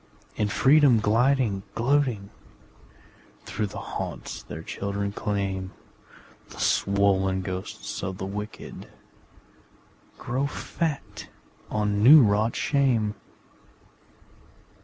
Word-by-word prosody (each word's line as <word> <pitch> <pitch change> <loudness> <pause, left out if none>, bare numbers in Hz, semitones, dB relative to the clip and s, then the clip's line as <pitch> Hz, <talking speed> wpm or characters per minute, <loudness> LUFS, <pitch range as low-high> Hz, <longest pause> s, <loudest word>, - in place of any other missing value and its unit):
In 105 - 0
freedom 135 +2 +5
gliding, 115 -1 +2
gloating, 120 -5 +1 1.1
Through 105 - -2
the 95 - -9
haunts - - -6
their 80 +2 -8
children 100 +2 -3
claim 95 -2 -3 0.8
The - - -12
swollen 95 -1 +2
ghosts 95 0 -5
of 95 -1 -4
the 95 - -4
wicked 105 +2 -7 1.3
Grow 130 +4 -2
fat 155 0 -4 0.4
on 105 -1 0
new 140 +5 +9
wrought 105 +2 +2
shame. 125 -7 +1
105 Hz, 90 wpm, -26 LUFS, 100-125 Hz, 1.3 s, new